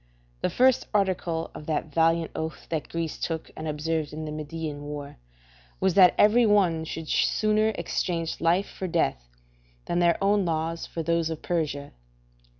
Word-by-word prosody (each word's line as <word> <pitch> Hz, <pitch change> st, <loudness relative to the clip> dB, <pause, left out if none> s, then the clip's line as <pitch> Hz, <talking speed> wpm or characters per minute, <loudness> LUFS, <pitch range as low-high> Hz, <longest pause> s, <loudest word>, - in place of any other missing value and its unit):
The -, -, +1 dB
first 255 Hz, 0 st, +3 dB
article 180 Hz, -4 st, 0 dB
of 150 Hz, -, -10 dB
that 155 Hz, -1 st, -2 dB
valiant 165 Hz, +1 st, +2 dB
oath 160 Hz, 0 st, -5 dB
that 160 Hz, -2 st, -3 dB
Greece 165 Hz, -2 st, -3 dB
took 160 Hz, -1 st, -3 dB
and 155 Hz, -, -5 dB
observed 155 Hz, 0 st, -2 dB
in 155 Hz, +1 st, -5 dB
the 155 Hz, -, -5 dB
Median 155 Hz, -1 st, -5 dB
war, 145 Hz, -1 st, -7 dB, 0.6 s
was 190 Hz, -1 st, +2 dB
that 185 Hz, -2 st, +7 dB
every 225 Hz, +3 st, +5 dB
one 180 Hz, -6 st, +3 dB
should 160 Hz, 0 st, -6 dB
sooner 215 Hz, +5 st, +2 dB
exchange 165 Hz, -2 st, -2 dB
life 175 Hz, +4 st, +2 dB
for 190 Hz, -, -5 dB
death, -, -, -1 dB, 0.6 s
than 175 Hz, -, 0 dB
their 170 Hz, -1 st, +4 dB
own 200 Hz, 0 st, +3 dB
laws 165 Hz, 0 st, -2 dB
for 165 Hz, -, -4 dB
those 170 Hz, 0 st, +1 dB
of 160 Hz, -1 st, -6 dB
Persia. 150 Hz, -5 st, -2 dB
165 Hz, 160 wpm, -26 LUFS, 155-180 Hz, 0.6 s, that